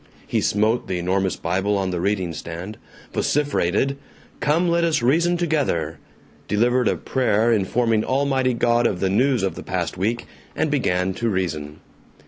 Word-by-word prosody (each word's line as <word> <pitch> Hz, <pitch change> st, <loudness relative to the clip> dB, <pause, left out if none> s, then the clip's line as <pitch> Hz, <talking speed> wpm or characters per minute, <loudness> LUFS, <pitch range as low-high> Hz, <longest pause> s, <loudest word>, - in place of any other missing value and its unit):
He -, -, 0 dB
smote 110 Hz, +3 st, +1 dB
the 90 Hz, -, -2 dB
enormous 95 Hz, +1 st, 0 dB
Bible 95 Hz, +4 st, 0 dB
on 95 Hz, -1 st, -1 dB
the 90 Hz, -1 st, -2 dB
reading 95 Hz, -3 st, -1 dB
stand, 85 Hz, +6 st, -7 dB, 0.3 s
vociferated, 140 Hz, -3 st, +1 dB, 0.4 s
"Come, 165 Hz, +4 st, +2 dB
let 170 Hz, 0 st, +2 dB
us 155 Hz, -6 st, +1 dB
reason 170 Hz, +7 st, +3 dB
together," 135 Hz, -, -1 dB, 0.5 s
delivered 120 Hz, +4 st, +2 dB
a -, -, +2 dB
prayer 115 Hz, -3 st, +1 dB
informing 110 Hz, +2 st, +1 dB
Almighty 130 Hz, -2 st, +1 dB
God 120 Hz, 0 st, +3 dB
of 90 Hz, -, -2 dB
the 95 Hz, -1 st, 0 dB
news 125 Hz, +2 st, +2 dB
of 95 Hz, -, 0 dB
the -, -, -8 dB
past -, -, -3 dB
week, 115 Hz, +5 st, -1 dB, 0.3 s
and 155 Hz, -, 0 dB
began 95 Hz, -9 st, +1 dB
to 115 Hz, +4 st, -1 dB
reason. 80 Hz, -6 st, -3 dB
110 Hz, 155 wpm, -22 LUFS, 95-130 Hz, 0.5 s, reason